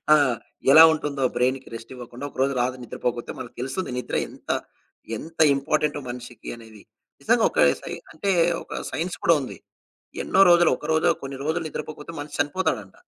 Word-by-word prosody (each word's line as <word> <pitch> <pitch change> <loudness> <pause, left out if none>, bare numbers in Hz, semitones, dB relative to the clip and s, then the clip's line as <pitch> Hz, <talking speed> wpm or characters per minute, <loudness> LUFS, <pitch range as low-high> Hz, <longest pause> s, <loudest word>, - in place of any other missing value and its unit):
ఆ! - - +6 0.6
ఎలా 160 - +11
ఉంటుందో 145 -3 -3
బ్రైన్‌కి 130 +2 0
రెస్ట్ 115 +2 -10
ఇవ్వకుండా 125 +2 -8
ఒక - - -23
రోజు 135 +1 +2
రాదు 125 +1 -1
నిద్రపోకపోతే 120 0 -3
మనకు 125 -2 -8
తెలుస్తుంది. 135 +6 -3
నిద్ర - - -5
ఎంత, - - -16 0.7
ఎంత 165 +1 -11 0.2
ఇంపార్టెంటో 145 +1 0
మనిషికి 120 -2 -8
అనేది. 110 -3 -14 0.4
నిజంగా - - +3
ఒక - - -2 0.2
సై - - -6 0.2
అంటే 195 +5 -1 0.3
ఒక - - -6
సైన్స్ 165 +5 -3
కూడా 170 - +6
ఉంది. 130 - -8 0.7
ఎన్నో 190 - +4
రోజులు, 175 -1 +5
ఒకరోజో 160 +1 +2
కొన్ని 135 0 -6
రోజులు 165 +2 0
నిద్రపోకపోతే 155 +1 -7
మనిషి 145 0 -8
చనిపోతాడంట. 140 - -2
140 Hz, 155 wpm, -24 LUFS, 125-160 Hz, 0.7 s, ఎలా